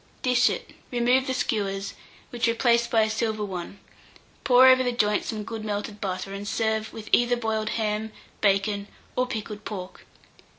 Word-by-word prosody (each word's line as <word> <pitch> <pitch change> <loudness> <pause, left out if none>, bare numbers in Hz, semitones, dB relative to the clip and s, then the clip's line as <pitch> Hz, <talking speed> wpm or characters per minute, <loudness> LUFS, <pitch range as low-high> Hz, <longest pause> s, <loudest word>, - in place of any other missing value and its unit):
Dish 250 -1 +4
it, - - -5 0.2
remove 250 +2 +2
the 260 - 0
skewers, 200 -5 -1 0.4
which 240 -1 0
replace 235 0 +3
by 225 -2 +3
a - - +1
silver 220 -1 -1
one; 185 0 -6 0.7
pour 255 0 +7
over 260 0 +7
the 250 -1 +1
joint 210 -3 +1
some 215 -2 -4
good 220 +1 -6
melted 210 0 -4
butter, 190 0 -3
and 200 +1 -6
serve 220 0 -1
with 220 -1 -9
either 245 0 +4
boiled 220 -2 -1
ham, 215 0 -1 0.3
bacon, 200 0 +1 0.3
or 255 0 +1
pickled 215 -3 -5
pork. 190 -4 -7
220 Hz, 165 wpm, -26 LUFS, 205-240 Hz, 0.7 s, pour